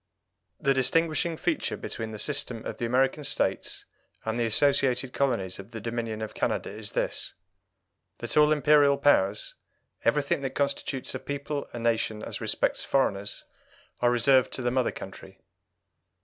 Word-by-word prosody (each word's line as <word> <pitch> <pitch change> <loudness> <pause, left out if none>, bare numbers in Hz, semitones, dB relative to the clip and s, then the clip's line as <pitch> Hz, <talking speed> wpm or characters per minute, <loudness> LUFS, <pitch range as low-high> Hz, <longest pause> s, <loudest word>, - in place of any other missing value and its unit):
The 135 - +3
distinguishing 160 +5 +1
feature - - -1
between 110 -1 -5
the 110 - -7
system 125 -3 -1
of - - -5
the 120 - -2
American 135 +4 +2
States - - -1 0.4
and 110 +2 -1
the 115 - +2
associated 130 0 +2
colonies 100 -10 0
of 100 +2 -9
the 115 -1 -7
Dominion 115 -1 -3
of 110 - -6
Canada - - -1
is 105 0 -6
this - - -2 0.8
that 120 - -3
all 150 0 +6
Imperial 150 -1 +5
powers, 105 -8 +2 0.5
everything 140 +3 +1
that 135 -1 -4
constitutes 140 -2 -1
a 130 - -3
people 140 +2 -4
a - - -7
nation 115 -2 0
as - - -5
respects - - 0
foreigners, 100 -7 0 0.6
are 120 - +3
reserved 125 +2 +4
to 130 - -4
the 120 - +1
mother 130 -1 +1
country. - - -10
125 Hz, 150 wpm, -27 LUFS, 115-140 Hz, 0.8 s, all